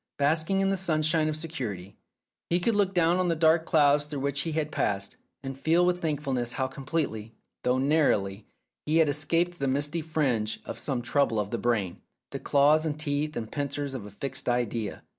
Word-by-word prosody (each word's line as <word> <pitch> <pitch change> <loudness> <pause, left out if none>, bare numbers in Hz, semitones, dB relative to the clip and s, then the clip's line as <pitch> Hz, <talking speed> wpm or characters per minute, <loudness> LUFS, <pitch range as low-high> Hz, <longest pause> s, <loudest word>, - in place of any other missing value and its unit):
Basking 160 +6 +2
in 195 0 +2
the 195 - 0
sunshine 155 -3 +1
of 155 - -2
security, 120 - -5 0.5
he 175 - +2
could 225 +6 +1
look 205 -2 +2
down 175 -1 +3
on 185 -1 +1
the 170 - +1
dark 160 +1 +3
clouds 145 -3 +4
through 145 -2 -5
which 140 0 0
he 165 - -3
had 155 -1 -1
passed, 100 -1 -1 0.3
and 135 0 -5
feel 165 +6 +2
with 180 0 +1
thankfulness 135 -6 -1
how 130 - -1
com 135 0 -11
pletely 115 -8 -2 0.3
(though 125 +1 +1
narrowly) 130 -9 +1 0.4
he 155 +2 +2
had 160 -2 +4
escaped 165 +4 +1
the 140 - 0
misty 145 +5 -1
fringe 135 -9 -1
of - - -6
some 130 -6 -2
trouble 125 -3 +1
of 105 -1 -3
the 115 - -2
brain, 105 -6 -1 0.3
the - - -4
claws 145 +2 +4
and 155 -2 -3
teeth 150 0 -2
and 110 -2 -5
pincers 145 -1 -3
of 115 -6 -6
a - - -9
fixed 125 +6 -5
idea. 120 -3 -2
145 Hz, 200 wpm, -27 LUFS, 125-160 Hz, 0.5 s, clouds